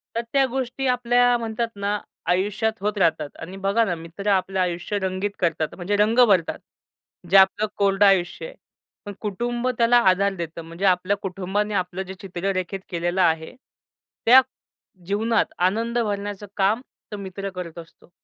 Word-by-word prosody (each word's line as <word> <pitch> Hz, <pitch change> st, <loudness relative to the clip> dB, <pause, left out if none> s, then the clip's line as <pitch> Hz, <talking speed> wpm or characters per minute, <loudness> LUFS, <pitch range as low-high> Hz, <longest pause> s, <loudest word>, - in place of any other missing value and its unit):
तर 230 Hz, -, +1 dB
त्या 275 Hz, -1 st, +4 dB
गोष्टी 260 Hz, +1 st, -3 dB
आपल्या 245 Hz, 0 st, +3 dB
म्हणतात 230 Hz, 0 st, -2 dB
ना 200 Hz, +1 st, -1 dB, 0.3 s
आयुष्यात 205 Hz, +5 st, +1 dB
होत 210 Hz, +1 st, -1 dB
राहतात 160 Hz, -5 st, +1 dB
आणि 180 Hz, +4 st, -8 dB
बघा 210 Hz, +4 st, +3 dB
ना 180 Hz, -4 st, -1 dB
मित्र 170 Hz, +5 st, -5 dB
आपलं 190 Hz, 0 st, 0 dB
आयुष्य 180 Hz, +3 st, -1 dB
रंगीत 190 Hz, +1 st, -2 dB
करतात 160 Hz, -3 st, -1 dB
म्हणजे 190 Hz, +3 st, -2 dB
रंग 220 Hz, +4 st, +3 dB
भरतात 185 Hz, -6 st, +2 dB, 0.7 s
जे 195 Hz, -, +6 dB
आपलं 195 Hz, +3 st, +5 dB
कोरडं 200 Hz, 0 st, +3 dB
आयुष्य 190 Hz, -, +2 dB
आहे. -, -, -10 dB, 0.5 s
पण 205 Hz, -, -6 dB
कुटुंब 240 Hz, +4 st, -2 dB
त्याला 235 Hz, +1 st, +5 dB
आधार 200 Hz, +2 st, +2 dB
देतं 170 Hz, -2 st, -6 dB
म्हणजे 170 Hz, +4 st, -4 dB
आपल्या 185 Hz, +2 st, +2 dB
कुटुंबाने 195 Hz, +2 st, -2 dB
आपलं 185 Hz, -1 st, -2 dB
जे 190 Hz, 0 st, -8 dB
चित्र 195 Hz, 0 st, -3 dB
रेखित 185 Hz, +1 st, -3 dB
केलेलं 175 Hz, +1 st, -1 dB
आहे. 160 Hz, -2 st, +1 dB, 0.7 s
त्या 255 Hz, +3 st, +9 dB, 0.7 s
जीवनात 220 Hz, +3 st, +1 dB
आनंद 225 Hz, +6 st, +1 dB
भरण्याचं 205 Hz, -2 st, -3 dB
काम 205 Hz, +4 st, +2 dB, 0.3 s
तो 210 Hz, -, -5 dB
मित्र 195 Hz, 0 st, -6 dB
करत 175 Hz, -2 st, -7 dB
असतो. 165 Hz, 0 st, -15 dB
195 Hz, 160 wpm, -23 LUFS, 180-220 Hz, 0.7 s, त्या